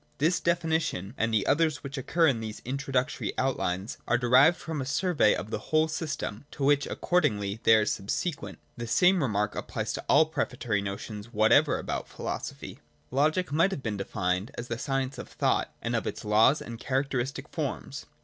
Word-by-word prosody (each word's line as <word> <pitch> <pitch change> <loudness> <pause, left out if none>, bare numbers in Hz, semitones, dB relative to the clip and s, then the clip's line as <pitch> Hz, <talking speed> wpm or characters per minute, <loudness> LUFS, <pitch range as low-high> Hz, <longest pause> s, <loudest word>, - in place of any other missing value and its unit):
This 165 +5 +2
definition, 160 - 0
and 115 -2 0
the 110 -2 +2
others 160 0 +2
which 140 -1 -6
occur 165 +5 +1
in 135 -7 +3
these 110 -1 -7
introductory 135 +1 -2
outlines, 105 -6 -1
are 115 - +3
derived 130 +7 +5
from 160 -3 -4
a - - -3
survey 145 - +2
of 105 - -6
the - - -2
whole 155 0 +3
system, 150 -7 -4
to 140 - -6
which 145 +1 +3
accordingly 105 - 0
they 115 - +6
are 110 -1 +3
subsequent. 110 - -3 0.2
The 120 0 -5
same 180 +8 +4
remark 105 -5 0
applies - - -4
to - - -5
all 160 - +6
prefatory 125 -8 -2
notions 100 +2 -6
what 110 0 +3
ever - - +5
about - - -4
philosophy. - - -6 0.3
Logic 155 +6 +1
might 165 +6 +3
have 170 -9 -5
been 105 -3 -2
defined 95 0 -1
as 120 +1 -6
the 115 0 -3
science 135 -1 -2
of - - -8
thought, - - 0
and - - -1
of - - -1
its - - -5
laws 110 +7 +4
and 115 -1 -8
characteristic 135 -1 -2
forms. - - -4
130 Hz, 180 wpm, -28 LUFS, 110-155 Hz, 0.3 s, they